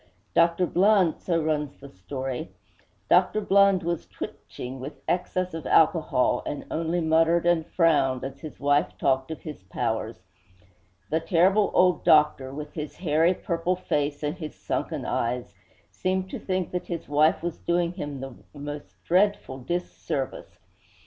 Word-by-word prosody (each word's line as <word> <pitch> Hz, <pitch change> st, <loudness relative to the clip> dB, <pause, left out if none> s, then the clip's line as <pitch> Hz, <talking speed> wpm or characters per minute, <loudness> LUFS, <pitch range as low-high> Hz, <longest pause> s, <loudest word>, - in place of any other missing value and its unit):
'Dr. 170 Hz, +2 st, +3 dB
Blund,' 185 Hz, -1 st, +3 dB
so 170 Hz, -2 st, 0 dB
runs 150 Hz, -2 st, -2 dB
the 140 Hz, -, -10 dB
story 130 Hz, -, -5 dB, 0.6 s
'Dr. 215 Hz, -, +4 dB
Blund 200 Hz, -2 st, +4 dB
was 170 Hz, 0 st, -2 dB
twitching 130 Hz, +2 st, -8 dB
with 135 Hz, +4 st, -8 dB
excess 185 Hz, 0 st, -1 dB
of 160 Hz, -4 st, -5 dB
alcohol, 155 Hz, -7 st, +3 dB
and 145 Hz, -, -5 dB
only 165 Hz, +2 st, -1 dB
muttered 165 Hz, +1 st, +3 dB
and 170 Hz, -2 st, +2 dB
frowned 145 Hz, -8 st, +2 dB
as 135 Hz, +1 st, -6 dB
his 155 Hz, 0 st, -9 dB
wife 145 Hz, +1 st, +1 dB
talked 135 Hz, 0 st, +1 dB
of 160 Hz, -, -7 dB
his 150 Hz, -8 st, -8 dB
powers. 95 Hz, -1 st, -3 dB, 0.9 s
The 160 Hz, -, +2 dB
terrible 185 Hz, +5 st, +3 dB
old 180 Hz, -3 st, +4 dB
doctor, 150 Hz, -3 st, +4 dB
with 150 Hz, +1 st, -7 dB
his 150 Hz, -2 st, -6 dB
hairy, 165 Hz, +1 st, +2 dB
purple 170 Hz, +2 st, -1 dB
face 145 Hz, -4 st, -2 dB
and 150 Hz, +3 st, -1 dB
his 155 Hz, -3 st, -6 dB
sunken -, -, -3 dB
eyes, 120 Hz, +1 st, -2 dB, 0.4 s
seemed 185 Hz, 0 st, -2 dB
to -, -, -4 dB
think 185 Hz, -2 st, -2 dB
that 180 Hz, -, -4 dB
his 170 Hz, -2 st, -5 dB
wife 150 Hz, +3 st, +3 dB
was 175 Hz, -1 st, -3 dB
doing 175 Hz, 0 st, 0 dB
him 145 Hz, -6 st, -6 dB
the 135 Hz, -1 st, -6 dB, 0.3 s
most 145 Hz, 0 st, -8 dB
dreadful 185 Hz, -7 st, +1 dB
dis 175 Hz, +8 st, -2 dB
service. 135 Hz, -2 st, -5 dB
160 Hz, 150 wpm, -26 LUFS, 145-175 Hz, 0.9 s, Dr